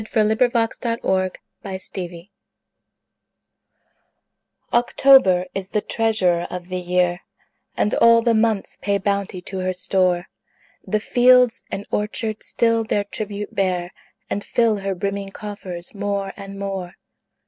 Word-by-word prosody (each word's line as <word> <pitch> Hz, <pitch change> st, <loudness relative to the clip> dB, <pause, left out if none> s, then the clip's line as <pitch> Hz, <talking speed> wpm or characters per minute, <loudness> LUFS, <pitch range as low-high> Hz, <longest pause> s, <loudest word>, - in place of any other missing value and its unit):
Paul 220 Hz, -, +3 dB
Laurence 235 Hz, -1 st, +1 dB
Dunbar 190 Hz, -6 st, 0 dB, 0.3 s
October 185 Hz, -3 st, -6 dB, 2.5 s
OCTOBER 240 Hz, -6 st, +5 dB
is 195 Hz, -1 st, -4 dB
the 210 Hz, -, 0 dB
treasurer 190 Hz, -8 st, +1 dB
of 180 Hz, 0 st, -7 dB
the 185 Hz, 0 st, -2 dB
year, 180 Hz, 0 st, +1 dB, 0.6 s
And 210 Hz, -, +1 dB
all 230 Hz, 0 st, +5 dB
the 235 Hz, -1 st, +3 dB
months 220 Hz, -2 st, 0 dB
pay 200 Hz, 0 st, +1 dB
bounty 200 Hz, -2 st, -2 dB
to 190 Hz, +1 st, -5 dB
her 185 Hz, 0 st, -1 dB
store: 180 Hz, -1 st, +1 dB, 0.6 s
The 215 Hz, -, 0 dB
fields 250 Hz, +2 st, +4 dB
and 200 Hz, -, -5 dB
orchards 215 Hz, +1 st, -2 dB
still 230 Hz, -1 st, +2 dB
their 210 Hz, -2 st, 0 dB
tribute 205 Hz, 0 st, -5 dB
bear, 180 Hz, -2 st, -1 dB, 0.4 s
And 205 Hz, -, -3 dB
fill 230 Hz, -3 st, +2 dB
her 195 Hz, -1 st, -2 dB
brimming 200 Hz, +1 st, -3 dB
coffers 190 Hz, -4 st, -7 dB
more 200 Hz, -1 st, -2 dB
and 195 Hz, -1 st, -9 dB
more. 195 Hz, -3 st, -4 dB
200 Hz, 125 wpm, -22 LUFS, 185-220 Hz, 2.5 s, OCTOBER